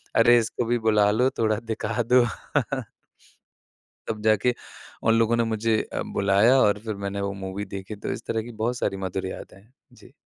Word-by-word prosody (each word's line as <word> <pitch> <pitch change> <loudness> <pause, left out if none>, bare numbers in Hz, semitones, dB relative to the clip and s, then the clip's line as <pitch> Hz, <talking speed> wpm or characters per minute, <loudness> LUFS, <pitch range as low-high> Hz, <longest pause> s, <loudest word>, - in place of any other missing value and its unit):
अरे! 120 +1 +6
इसको 115 +1 -2
भी 120 +1 +1
बुला 105 -2 +4
लो, 125 +5 +2
थोड़ा 110 -2 +1
दिखा 115 +2 -2
दो। 125 -1 +6 1.8
तब 110 -1 -4
जाके 110 +3 +3 0.5
उन 115 - +4
लोगों 115 +1 +3
ने 115 - +2
मुझे 110 0 0
अ, - - -2
बुलाया 100 +6 +4
और 105 0 +3
फिर 110 -1 -3
मैंने 100 0 -3
वो 100 0 -2
मूवी 95 +2 -4
देखी, 100 +1 -7
तो 100 - -5
इस 115 - -6
तरह 110 - -1
की 120 - -9
बहुत 120 +2 0
सारी 100 - -1
मधुर 95 0 -3
यादें 95 - -9
हैं। 110 +5 -27 0.2
जी। - - -18
110 Hz, 185 wpm, -25 LUFS, 100-115 Hz, 1.8 s, अरे